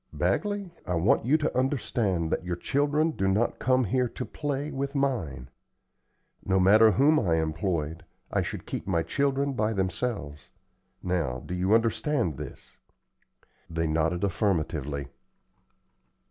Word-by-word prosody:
Bagley, 205 -3 -1 0.2
I 90 - 0
want 90 +6 +2
you 150 +4 +5
to 155 0 -2
understand 115 - 0
that - - 0
your 90 -1 -2
children 145 - +1
do 95 -10 -1
not 105 +5 +1
come 130 +1 +3
here 125 +2 +1
to 125 - -5
play 145 0 -3
with 140 +1 -3
mine. 90 - -1 1.0
No 95 0 +2
matter 105 +4 +7
whom 145 +7 +4
I 85 -7 +1
employed, 80 0 -2 0.3
I - - +2
should - - -5
keep - - -5
my 85 -4 +1
children 140 - 0
by 110 -2 0
themselves. 95 - -3 0.5
Now, 80 -9 -1
do - - -5
you 95 +4 +3
understand 115 - +1
this?" 75 -2 -10 0.9
They 80 0 -1
nodded 80 +3 0
affirmatively. 80 - -1
100 Hz, 135 wpm, -27 LUFS, 85-135 Hz, 1.0 s, matter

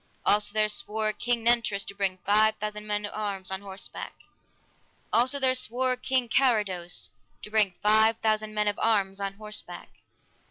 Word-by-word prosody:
Also 210 0 +3
there 215 0 +2
swore 215 0 -1
King 235 +2 -1
Nentres 230 -4 +2
to - - -7
bring 195 -2 -1
five 215 +2 +4
thousand 210 0 -5
men 210 0 -1
of 205 - -7
arms 200 -3 -4
on 190 0 -3
horseback. 195 -1 -7 1.0
Also 255 +4 +3
there 260 -2 +2
swore 255 +1 0
King 255 0 0
Carados 210 -9 +1 0.3
to 210 - -8
bring 210 -4 +2
five 220 +1 +5
thousand 215 -1 -1
men 210 0 +1
of 205 - -1
arms 200 -3 +1
on 195 0 -3
horseback. 210 0 -7
215 Hz, 160 wpm, -27 LUFS, 200-225 Hz, 1.0 s, five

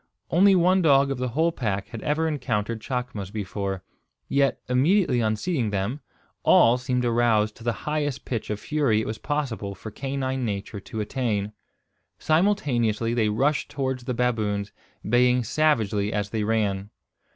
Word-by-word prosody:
Only 195 +3 +6
one 185 +1 +4
dog 140 -4 +4
of 135 - -3
the 125 - -1
whole 160 +8 +1
pack 105 - -3
had 115 - -7
ever 155 +2 0
encountered 115 -7 -2
chacmas 120 -5 -4
before; 100 -2 -4 0.4
yet, 140 -1 +2
immediately 130 - +3
on 110 -1 +1
seeing 125 - -1
them, 100 +7 -2 0.4
all 120 +2 +5
seemed 125 -1 -1
aroused 115 -2 +2
to 115 - -13
the 120 - +1
highest 145 -3 -2
pitch 115 -4 -3
of 105 -1 -2
fury 140 -7 +1
it 110 - -2
was 110 - -4
possible 125 -9 -3
for 110 +3 -9
canine 135 +1 -3
nature 100 -1 -4
to 110 +2 -6
attain. 105 -3 -2 0.6
Simultaneously 130 - +1
they 110 -3 +2
rushed 140 +8 +1
towards 130 -3 -3
the 125 -2 -2
baboons, 110 -4 -1 0.4
baying 125 +2 +3
savagely 110 -7 +1
as 105 -1 -2
they 110 -2 -1
ran. 105 -2 0
120 Hz, 155 wpm, -25 LUFS, 105-140 Hz, 0.6 s, Only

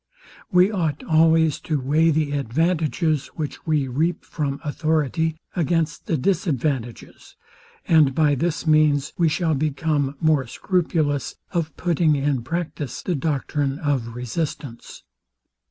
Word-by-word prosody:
We 185 +3 +5
ought 160 -8 -2
always 160 -1 +3
to 155 -4 -2
weigh 150 +5 +2
the 155 -2 +1
advantages, 155 +3 0
which 155 0 -6
we 150 -4 +1
reap 155 +7 -1
from 145 -3 -3
authority, 155 +1 0 0.2
against 165 -3 -1
the 160 - +1
disadvantages; 135 - -2 0.5
and 150 -5 +4
by 150 -2 +3
this 160 +3 -1
means 150 -2 +3
we 165 -2 +4
shall 160 +1 0
become 145 -1 0
more 155 -5 +2
scrupulous 155 -3 -1 0.2
of 160 -4 -2
putting 165 -3 +2
in 140 -2 0
practice 155 0 -4
the 180 - -1
doctrine 145 -2 -1
of 130 -7 -2
resistance. 125 0 -5
155 Hz, 120 wpm, -23 LUFS, 140-165 Hz, 0.5 s, We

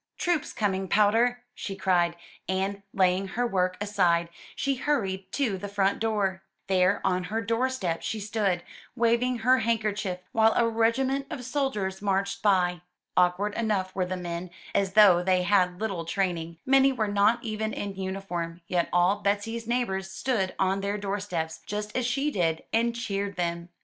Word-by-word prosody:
'Troops 345 -5 0
coming, 195 -3 -1
Powder!'' 230 +5 +3
she 195 -5 -5
cried, 175 -3 +2 0.3
and, 195 +1 -1
laying 185 0 +2
her 240 +6 -1
work 185 -4 0
aside, 180 -5 +1 0.3
she 275 - 0
hurried 195 -9 -1
to 230 -10 0
the 205 - -5
front 200 -1 +1
door. 205 -4 0 0.2
There, 190 +1 +2
on 185 -1 +1
her 220 +4 -2
doorstep, 230 -5 -1
she 220 - -3
stood, 200 -4 -1 0.3
waving 240 +1 +2
her 255 +3 +4
handkerchief 210 -4 -1
while 220 0 +4
a 235 - +3
regiment 260 +5 +1
of 250 -5 -6
soldiers 215 -9 -2
marched 195 0 0
by. 180 -4 +2 0.3
Awkward 180 +3 +2
enough 205 -5 -1
were 185 -1 -1
the 185 0 -3
men, 175 0 -5 0.2
as 195 -2 +1
though 200 -5 +7
they 185 0 +2
had 185 -1 +4
had 180 0 -16
little 195 -6 -2
training; 170 -2 -2
many 270 +1 +5
were 225 -5 -1
not 205 +4 +2
even 220 -1 -2
in 200 -2 -4
uniform; 185 -3 -4
yet 175 0 0
all 180 +4 +3
Betsy's 220 +3 -1
neighbors 195 -6 -1
stood 195 -2 -1
on 190 +1 +1
their 200 +1 -1
doorsteps, 195 -5 -3
just 210 +1 -4
as 255 -2 +1
she 275 +4 0
did, 165 - 0
and 230 +1 +2
cheered 200 -4 -3
them. 170 -1 -2
200 Hz, 165 wpm, -27 LUFS, 185-225 Hz, 0.3 s, though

